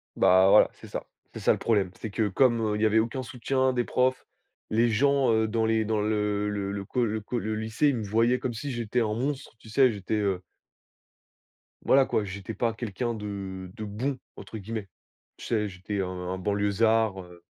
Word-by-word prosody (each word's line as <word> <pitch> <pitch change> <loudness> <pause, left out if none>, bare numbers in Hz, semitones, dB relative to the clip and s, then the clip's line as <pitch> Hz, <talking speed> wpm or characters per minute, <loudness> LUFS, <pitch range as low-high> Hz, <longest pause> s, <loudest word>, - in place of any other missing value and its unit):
Bah, 95 +1 +5
voilà, - - +7
c'est - - -13
ça, - - -5 0.3
c'est - - -7
ça - - +4
le - - +1
problème. 100 -5 +1
C'est 110 - -5
que 105 0 0
comme 115 0 +2
il - - -4
y - - +4
avait 110 +1 +4
aucun 115 +4 -1
soutien 130 +2 0
des 120 -1 +1
profs, 130 +2 0 0.4
les 115 +2 +3
gens, 135 +3 +3
heu, 110 0 +3
dans 110 +1 0
les 110 0 +2
dans 110 0 0
le 105 -1 0
le 100 -1 -3
le 100 -1 -4
co 125 +4 0
le 110 0 -1
co 110 +4 -4
le 110 -1 -2
lycée, 110 +7 +1
ils 135 - 0
me 110 - -3
voyaient 115 +5 +2
comme 125 -1 -3
si 135 +5 -5
j'étais 120 0 -1
un 110 -2 0
monstre, 135 +4 -3
tu - - -16
sais, 130 +3 +4
j'étais, 100 0 -3
heu 100 -4 0 1.4
voilà 135 0 +5
quoi, 110 - 0
j'étais 100 +2 -6
pas 115 0 0
quelqu'un 115 +1 -3
de 100 -3 -6
de 110 - -6
«bon», 125 +7 -3 0.2
entre 110 - -8
guillemets. 110 0 -5 0.5
Tu - - -10
sais, 105 -2 0
j'étais 95 +2 -4
un 95 - -1
un 90 0 -4
banlieusard, 105 +1 +1
heu. 90 -1 -15
110 Hz, 210 wpm, -27 LUFS, 100-120 Hz, 1.4 s, voilà